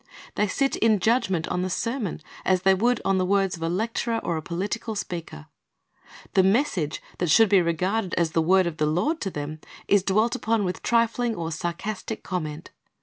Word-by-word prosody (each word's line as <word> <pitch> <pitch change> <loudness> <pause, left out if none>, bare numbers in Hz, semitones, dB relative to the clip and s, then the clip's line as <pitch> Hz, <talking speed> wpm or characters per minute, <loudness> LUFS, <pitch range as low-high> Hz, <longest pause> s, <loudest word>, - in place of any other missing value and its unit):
They 210 - +1
sit 275 +7 0
in 220 -2 +3
judgment 190 -5 +1
on 180 - -1
the 185 - -1
sermon 230 - -2 0.2
as 185 -1 +2
they 195 0 +6
would 235 +5 +2
on 195 -1 +2
the - - +2
words 195 0 +1
of 165 - -13
a 165 - -1
lecturer 230 +5 -1
or 170 - -1
a 160 - -3
political 205 +7 -3
speaker. 170 - -6 0.9
The 190 - +5
message 190 - +1 0.2
that 175 - 0
should 220 +6 +6
be 195 -2 +5
regarded 180 +4 -1
as 170 -2 +1
the 165 - +2
word 185 +3 +4
of 170 -2 -3
the 150 - +1
Lord 235 - 0
to 195 - -1
them 150 -1 -6 0.3
is 200 -1 +4
dwelt 215 +5 +1
upon 225 -3 0
with 180 -1 -3
trifling 235 0 +1
or 165 -2 -4
sarcastic 190 +7 -4
comment. 160 -3 -5
190 Hz, 195 wpm, -25 LUFS, 170-225 Hz, 0.9 s, they